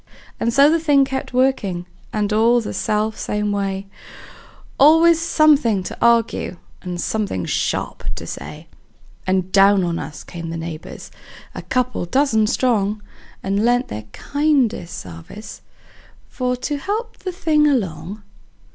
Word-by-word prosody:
And 230 - +1
so 275 +4 +6
the 330 +2 +3
thing 290 -4 +4
kept 265 0 -4
workin', 250 -9 0 0.3
and 210 -1 -1
all 230 +3 +4
the 225 - -5
self 215 0 -1
same 210 0 -1
way; 195 -1 -2 0.9
Always 325 +3 +6
somethin' 290 - +3
to - - -7
arg'e, 230 -5 +2 0.2
and 180 -1 -5
somethin' 200 - -2
sharp - - -2
to - - -7
say; - - -8 0.6
And 185 0 0
down 195 0 +5
on 170 -1 -1
us 150 - -7
came 170 -2 -7
the 165 - -4
neighbors, 165 -1 -8 0.4
a - - -6
couple 250 -7 -1
dozen 220 0 +2
strong, 215 -4 0 0.4
And 200 +2 0
lent 245 +2 +2
their 105 0 -6
kindest 280 - 0
sarvice 90 - -10 0.7
for 250 -1 -2
to 290 +4 -3
help 430 - -4
the 370 - -4
thing 315 -5 +2
along. 205 - -2
220 Hz, 140 wpm, -20 LUFS, 195-275 Hz, 0.9 s, so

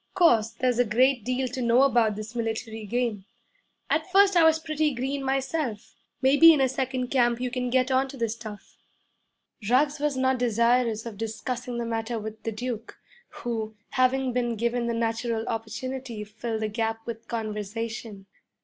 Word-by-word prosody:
Course, 235 - +4
there's 245 +1 0
a - - +6
great 245 +2 +2
deal 255 +2 -1
to 255 +1 -4
know 240 +2 +4
about 235 -6 +3
this 215 +2 -7
military 225 -1 -3
game. 230 -3 -1 0.6
At - - -1
first 395 0 +5
I 340 - +6
was 320 0 +5
pretty 310 -3 -1
green 270 +3 -2
myself. 270 -4 -2 0.3
May 270 +2 +5
be 330 +2 +10
in 305 - +3
a 265 - +4
second 260 -1 -2
camp 240 -3 +2
you 250 0 -2
can 250 -1 -2
get 255 +1 +2
onto 265 +1 +1
the 230 -2 0
stuff.' 215 -2 -8 0.9
Ruggs 285 +4 +3
was 295 -2 0
not 260 -1 +2
desirous 235 -1 +2
of 215 -3 -8
discussing 240 +2 -4
the 235 - -2
matter 225 0 -2
with 220 0 -7
the 225 - -3
Duke, 230 0 -5 0.3
who, 220 -2 -4
having 255 0 +1
been 240 -1 0
given 235 +2 -1
the 235 - -1
natural 230 0 -1
opportunity, 230 +1 -4
filled 220 +1 -4
the - - +1
gap 225 +1 -2
with 230 -1 -7
conversation. 220 -1 -5
240 Hz, 170 wpm, -26 LUFS, 225-260 Hz, 0.9 s, be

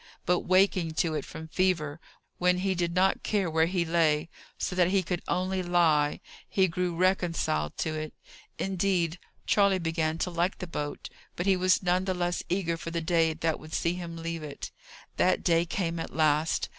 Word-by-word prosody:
But 180 0 +3
waking 185 -3 +2
to 160 0 +1
it 150 -3 -2
from 160 - -8
fever, 160 -4 0 0.4
when 180 0 +3
he 190 - +2
did 170 -1 -1
not 190 +1 +3
care 195 -6 0
where 160 +1 +3
he 175 -1 0
lay, 160 -2 +2 0.3
so 180 - -3
that 180 -1 +4
he 190 0 +2
could 175 0 -3
only 185 +1 0
lie, 165 -5 +2 0.3
he 190 -1 +3
grew 175 0 -2
reconciled 170 - 0
to 160 - -1
it. 155 0 -5 0.4
Indeed, 180 -3 0 0.3
Charley 200 -2 +4
began 165 -2 -1
to 180 - -2
like 175 +2 0
the - - -5
boat; 150 -4 -5 0.3
but 175 - -3
he 195 -1 +4
was 185 +1 +2
none 180 +1 +1
the 185 -1 -1
less 175 0 -1
eager 170 -2 0
for 165 - -6
the 170 0 -2
day 165 -1 +2
that 160 0 -1
would 155 - -12
see 170 - +1
him 170 -2 -6
leave 165 0 -4
it. 145 -2 -7 0.5
That 185 - +2
day 170 -1 +3
came 170 -1 -2
at - - -6
last. 155 0 +2
170 Hz, 190 wpm, -28 LUFS, 160-185 Hz, 0.5 s, that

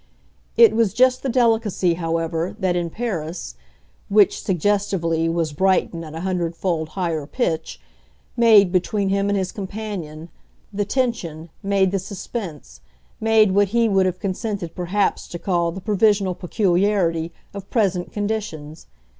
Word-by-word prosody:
It 225 -2 +7
was 220 -3 +2
just 255 +1 +4
the 270 - -2
delicacy, 225 -7 +2
however, 165 +1 -2
that 185 -4 0
in 175 -1 -1
Paris 170 - -4 0.6
which, 205 -1 +4
suggestively, 180 -3 0
was 165 -2 -1
Brighton 185 0 +1
at 155 -1 -9
a 165 - -5
hundredfold 170 -3 -2
higher 165 -5 -2
pitch 160 - -2 0.6
made, 215 -5 +6
between 195 +2 0
him 200 +1 +1
and 205 - +1
his 190 -1 -2
companion, 190 -6 -6 0.4
the 205 0 -1
tension, 190 - -2
made 195 -1 +2
the 195 - 0
suspense, 175 - -7 0.4
made 220 -2 +4
what 200 +1 +3
he 230 +3 +2
would 195 -3 +3
have 185 -1 -2
consented 195 -3 -3
perhaps 190 +3 -1
to 175 - -6
call 170 -2 0
the 190 +3 -8
provisional 205 -2 +2
peculiarity, 180 -3 +1 0.2
of 200 -1 -8
present 190 -6 0
conditions. 205 -8 -4
190 Hz, 140 wpm, -22 LUFS, 170-210 Hz, 0.6 s, It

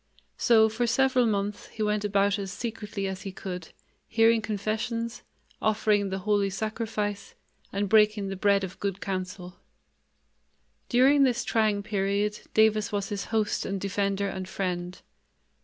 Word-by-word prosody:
So 220 -2 +5
for 230 +2 -1
several 255 0 +3
months 205 -1 -2
he 220 - -4
went 210 0 0
about 200 0 +2
as 195 -2 -4
secretly 215 -3 -4
as 190 -1 -5
he 195 - -6
could, 180 -3 -7 0.4
hearing 225 0 +4
confessions, 220 +2 -3 0.4
offering 210 -2 +2
the 190 - -2
Holy 200 +1 +1
Sacrifice, 210 0 -3 0.4
and 200 +1 -1
breaking 210 -1 +4
the 195 - -3
bread 200 0 +2
of 185 -1 -6
good 200 -1 -2
counsel. 185 -2 -5 1.3
During 270 +4 +5
this 255 -3 +3
trying 215 -3 +1
period, 205 0 -1 0.2
Davis 220 -1 +3
was 200 -1 -2
his 200 -1 -3
host 220 -2 0
and 195 0 -3
defender 200 0 -1
and 190 -1 -5
friend. 180 -2 -3
205 Hz, 140 wpm, -27 LUFS, 195-220 Hz, 1.3 s, So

